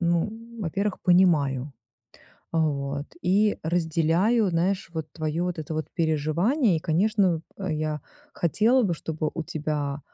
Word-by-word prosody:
ну, 170 Hz, +3 st, +1 dB, 0.3 s
во-первых, 200 Hz, +3 st, -2 dB
понимаю. 150 Hz, -7 st, +3 dB, 0.8 s
Вот, 145 Hz, -3 st, 0 dB, 0.2 s
и 205 Hz, +4 st, +2 dB
разделяю, 170 Hz, +6 st, +2 dB
знаешь, 185 Hz, +3 st, 0 dB
вот 160 Hz, -2 st, -4 dB
твое 155 Hz, +1 st, -2 dB
вот 180 Hz, -2 st, -2 dB
это 155 Hz, 0 st, -4 dB
вот 155 Hz, 0 st, -3 dB
переживание. 170 Hz, -, +1 dB
И -, -, -3 dB
конечно, 185 Hz, +1 st, +2 dB, 0.2 s
я 155 Hz, -5 st, -2 dB, 0.3 s
хотела 225 Hz, +9 st, +3 dB
бы, 180 Hz, -5 st, +1 dB
чтобы 155 Hz, -1 st, -3 dB
у 165 Hz, -, -2 dB
тебя 150 Hz, -2 st, -3 dB
165 Hz, 125 wpm, -26 LUFS, 155-190 Hz, 0.8 s, понимаю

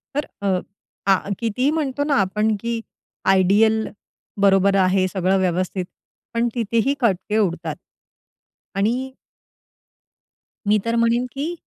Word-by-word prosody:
तर 290 Hz, -, -1 dB
अ, 190 Hz, -2 st, +1 dB, 0.5 s
आह, 190 Hz, +1 st, +1 dB
कितीही 240 Hz, +4 st, 0 dB
म्हणतो 285 Hz, -3 st, -1 dB
ना 290 Hz, -1 st, +1 dB
आपण, 210 Hz, +3 st, +1 dB
की 230 Hz, 0 st, -3 dB, 0.4 s
आयडियल 205 Hz, +4 st, +4 dB, 0.5 s
बरोबर 195 Hz, 0 st, +4 dB
आहे 185 Hz, 0 st, +3 dB
सगळं 190 Hz, 0 st, +1 dB
व्यवस्थित. 185 Hz, 0 st, -1 dB, 0.5 s
पण 235 Hz, +1 st, +1 dB
तिथेही 230 Hz, +3 st, +1 dB
खटके 210 Hz, -1 st, +1 dB
उडतात. 185 Hz, -5 st, -1 dB, 1.0 s
आणि 245 Hz, +7 st, 0 dB, 1.5 s
मी 210 Hz, +1 st, +5 dB
तर 230 Hz, -, 0 dB
म्हणेन 235 Hz, +1 st, +2 dB
की 295 Hz, +5 st, -3 dB
215 Hz, 115 wpm, -22 LUFS, 190-235 Hz, 1.5 s, मी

